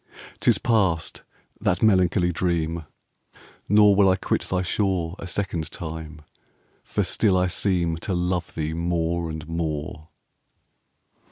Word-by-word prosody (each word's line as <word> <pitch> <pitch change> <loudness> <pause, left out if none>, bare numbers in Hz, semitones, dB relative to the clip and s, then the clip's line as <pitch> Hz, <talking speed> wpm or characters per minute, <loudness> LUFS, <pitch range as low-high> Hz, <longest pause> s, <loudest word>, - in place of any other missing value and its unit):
'Tis - - +4
past, 95 -8 +1 0.4
that 90 +3 0
melancholy 90 -3 +3
dream! 85 -2 -1 0.5
5 - - -22 0.3
Nor 105 0 +6
will 100 -1 +5
I 95 - +4
quit 95 - -1
thy 90 0 0
shore 90 -3 -1
A 95 - -6
second 85 -4 -2
time; 80 -2 -7 0.6
for - - -1
still 100 -4 +2
I 90 - +3
seem 90 -2 0
To 95 +3 -3
love 90 0 -2
thee 80 0 -2
more 85 0 -1
and 80 -1 -6
more. 80 -1 -4
85 Hz, 135 wpm, -24 LUFS, 80-95 Hz, 0.6 s, Nor